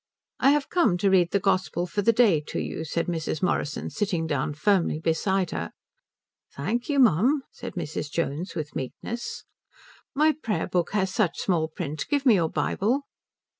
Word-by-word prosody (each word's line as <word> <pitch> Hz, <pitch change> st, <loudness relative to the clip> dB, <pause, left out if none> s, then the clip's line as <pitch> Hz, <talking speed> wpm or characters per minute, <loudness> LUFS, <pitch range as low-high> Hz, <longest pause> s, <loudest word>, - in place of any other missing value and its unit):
"I 270 Hz, -, +5 dB
have 290 Hz, 0 st, +1 dB
come 245 Hz, -, +3 dB
to 195 Hz, +2 st, +2 dB
read 180 Hz, -3 st, +4 dB
the 200 Hz, -, +1 dB
gospel 185 Hz, -2 st, 0 dB
for 180 Hz, +4 st, -2 dB
the 230 Hz, -, +4 dB
day 220 Hz, -9 st, +4 dB
to -, -, -4 dB
you," 160 Hz, -, -4 dB
said 165 Hz, +2 st, -1 dB
Mrs. 160 Hz, -2 st, -3 dB
Morrison, 150 Hz, -4 st, -1 dB
sitting 190 Hz, -6 st, -1 dB
down 145 Hz, -2 st, -1 dB
firmly 170 Hz, -1 st, +2 dB
beside 180 Hz, +3 st, 0 dB
her. 85 Hz, 0 st, -3 dB, 0.9 s
"Thank 220 Hz, -, -2 dB
you 290 Hz, -, +1 dB
mum," 255 Hz, -, +4 dB
said -, -, -8 dB
Mrs. 155 Hz, -3 st, -4 dB
Jones 165 Hz, +3 st, -3 dB
with 150 Hz, -3 st, -5 dB
meekness. 225 Hz, -, -5 dB, 0.7 s
"My 305 Hz, +2 st, +5 dB
prayer 215 Hz, -, -1 dB
book 175 Hz, +1 st, -1 dB
has 190 Hz, -2 st, 0 dB
such 190 Hz, -7 st, +1 dB
small 165 Hz, -4 st, +1 dB
print 155 Hz, -2 st, -5 dB
give 285 Hz, -1 st, 0 dB
me 245 Hz, -, +7 dB
your 170 Hz, -5 st, +2 dB
Bible." 210 Hz, -, 0 dB
185 Hz, 170 wpm, -26 LUFS, 160-220 Hz, 0.9 s, me